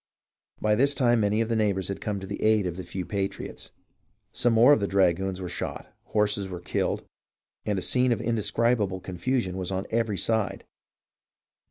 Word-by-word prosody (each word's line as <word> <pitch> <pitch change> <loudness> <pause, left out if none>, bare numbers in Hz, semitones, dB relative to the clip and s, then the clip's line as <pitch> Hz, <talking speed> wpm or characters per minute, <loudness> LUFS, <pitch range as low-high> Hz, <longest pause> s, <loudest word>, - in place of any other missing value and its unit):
By 105 0 +2
this 140 +6 +2
time 120 -3 +3
many 105 +1 +2
of 115 - -1
the 115 - +1
neighbours 100 -4 +1
had 100 - -4
come 105 -2 -2
to 95 - -7
the 100 +1 -6
aid 110 -2 +3
of 90 -2 -3
the 95 - -6
few 90 -1 -5
patriots. 100 0 -4 0.6
Some 120 0 +2
more 120 +6 +7
of - - +3
the 100 - -1
dragoons 95 -1 +1
were 90 - -4
shot, - - -5
horses 105 -2 0
were 90 -1 -6
killed, 90 - -2 0.6
and 105 -2 +1
a 95 - -1
scene 125 0 +3
of 115 - +1
indescribable 110 -2 +1
con 90 -1 -8
fusion 120 -6 0
was 95 0 -2
on 95 0 -2
every 110 -3 0
side. 100 -1 0
105 Hz, 190 wpm, -26 LUFS, 95-115 Hz, 0.6 s, more